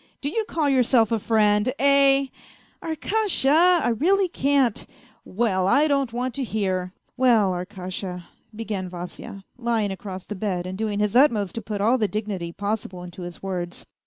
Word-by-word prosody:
Do 285 - -3
you 440 +7 -1
call 320 -7 -1
yourself 250 -4 +3
a 225 - +1
friend? 210 +1 +2
Eh? 275 0 +5 0.2
" - - -24
" - - -35
Arkasha, 340 -1 +3
I - - +2
really 370 - +2
can't! 275 - +1
" 215 - -27
" - - -45
Well, 190 -6 +2
I 280 +8 +4
don't 275 -4 0
want 245 +1 -3
to 275 - -2
hear... 190 -5 -2
." - - -50
" - - -47
Well, 235 -7 +4
Arkasha! 180 -1 -6 0.2
" 220 - -24
began 195 -5 -4
Vasya, 180 +2 -8 0.2
lying 230 -4 0
across 190 -1 -7
the - - -6
bed 185 -3 -3
and 185 +1 -5
doing 210 0 -2
his 210 +1 0
utmost 225 - +3
to 230 - -5
put 205 -1 -4
all 235 +5 +3
the 215 - +2
dignity 200 -5 -4
possible 200 -2 -4
into 180 +1 -10
his 175 +1 -8
words. 180 -2 -5
220 Hz, 190 wpm, -24 LUFS, 190-270 Hz, 0.2 s, Eh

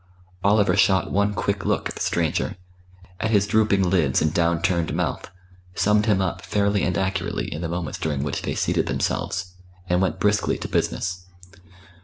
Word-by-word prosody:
Oliver 105 0 +4
shot 95 -2 +3
one 100 +1 +1
quick 100 -1 -1
look - - 0
at - - -6
the - - -9
stranger, 85 +1 0 0.6
at 110 - -1
his 100 -3 +3
drooping 100 -3 +2
lids 85 -7 +2
and 80 0 0
down 85 -1 +2
turned 85 -1 0
mouth, - - -2 0.5
summed 105 +1 +2
him 105 -3 +3
up 95 0 -3
fairly 100 0 +1
and 85 -1 0
accurately 95 -1 -2
in 75 - -5
the 85 - -3
moments 85 -1 -4
during 75 -3 -1
which 75 - -3
they - - -3
seated - - 0
themselves, 90 0 -2 0.3
and 90 0 +2
went 95 0 0
briskly 105 +2 +1
to - - -5
business. 90 0 -2
95 Hz, 175 wpm, -23 LUFS, 85-100 Hz, 0.6 s, Oliver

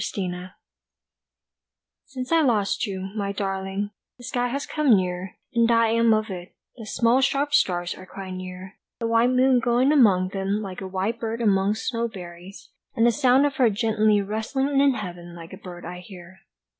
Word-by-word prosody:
ELEGY 180 -1 -4 1.6
SINCE 255 -1 -6
I 330 -1 +5
lost 225 -4 +1
you, 190 -1 -5
my 200 -2 -2
darling, 195 0 -3 0.3
the 245 - -15
sky 245 0 -1
has 280 +4 -3
come 290 -8 +3
near, 180 0 -3 0.2
And 235 -1 +3
I 230 -1 +4
am 230 0 +3
of 215 -1 +1
it, 180 -1 -8 0.2
the 225 -3 -10
small 235 +4 +2
sharp 285 +1 +1
stars 175 -9 +2
are 185 - -12
quite 190 -1 -8
near, 185 +1 -8 0.2
The 230 - -4
white 230 +1 +3
moon 255 0 +4
going 245 +3 +2
among 200 -11 +4
them 195 +1 -2
like 190 -1 -7
a 190 - -5
white 195 +5 -2
bird 225 0 -3
among 200 -2 +2
snow 235 +1 -2
berries, 180 -2 -11 0.2
And 230 - +3
the 240 - +5
sound 265 +1 +4
of 285 -2 -2
her 250 -3 +5
gently 215 -1 +2
rustling 265 +7 -1
in 280 -2 +4
heaven 175 -4 -7
like 165 -1 -11
a - - -8
bird 175 -1 -10
I 180 +1 -7
hear. 180 0 -13
210 Hz, 180 wpm, -24 LUFS, 185-240 Hz, 1.6 s, I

